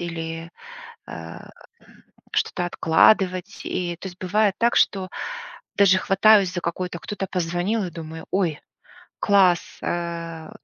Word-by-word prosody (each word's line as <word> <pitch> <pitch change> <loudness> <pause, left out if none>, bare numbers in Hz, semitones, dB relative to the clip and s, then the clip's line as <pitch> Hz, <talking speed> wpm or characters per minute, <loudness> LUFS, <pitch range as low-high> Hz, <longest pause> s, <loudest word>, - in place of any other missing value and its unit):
или, 165 -1 -5 0.6
э, - - -8 0.9
что-то 180 - 0
откладывать. 185 +3 +2
И, 175 -1 -3
то 190 - -6
есть 180 0 -13
бывает 200 +2 +1
так, 235 +1 +2
что 190 -2 +2 0.7
даже 195 -2 +5
хватаюсь 195 -1 +4
за 175 - -3
какое-то, 170 +1 -4
кто-то 205 -1 -5
позвонил, 180 +4 -1
я 175 - -6
думаю: 160 -1 -8
"Ой, 175 -6 0 0.6
класс!" 190 -4 +3
Э, 170 -2 -4
180 Hz, 120 wpm, -23 LUFS, 170-195 Hz, 0.9 s, даже